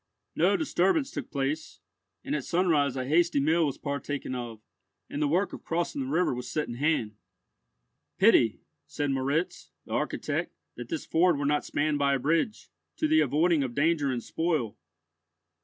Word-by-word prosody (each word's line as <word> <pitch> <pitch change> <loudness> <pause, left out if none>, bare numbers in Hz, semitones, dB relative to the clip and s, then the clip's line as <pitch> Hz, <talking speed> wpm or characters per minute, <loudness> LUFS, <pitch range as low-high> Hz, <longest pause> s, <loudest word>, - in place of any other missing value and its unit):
No - - +3
disturbance 270 - +1
took - - -6
place, 145 +3 -3 0.4
and - - -2
at 145 - -2
sunrise 155 -6 +2
a 130 -1 -2
hasty 170 +2 +3
meal 160 +3 +3
was 140 - -4
partaken 140 -2 -4
of, 120 -3 -5 0.5
and 145 - -3
the 150 - +3
work 180 +7 +1
of - - -8
crossing 165 -4 -2
the 130 - -3
river 160 +2 +1
was 125 0 -5
set 150 - -2
in 120 - -5
hand. 120 -6 0 1.0
"Pity," 190 - +4 0.3
said 145 -1 -2
Moritz, 140 +6 -1 0.2
the - - -13
architect, - - -2 0.2
"that - - -8
this 325 -2 -4
ford 170 -1 +3
were 140 - -2
not 145 +1 +1
spanned 145 0 0
by 140 -1 +3
a - - -1
bridge, 165 - -1 0.3
to 310 - +1
the 315 +1 +4
avoiding 160 +1 +2
of 125 -3 -3
danger 145 -2 +2
and 120 -2 -3
spoil." 160 -10 -1
150 Hz, 175 wpm, -28 LUFS, 135-170 Hz, 1.0 s, Pity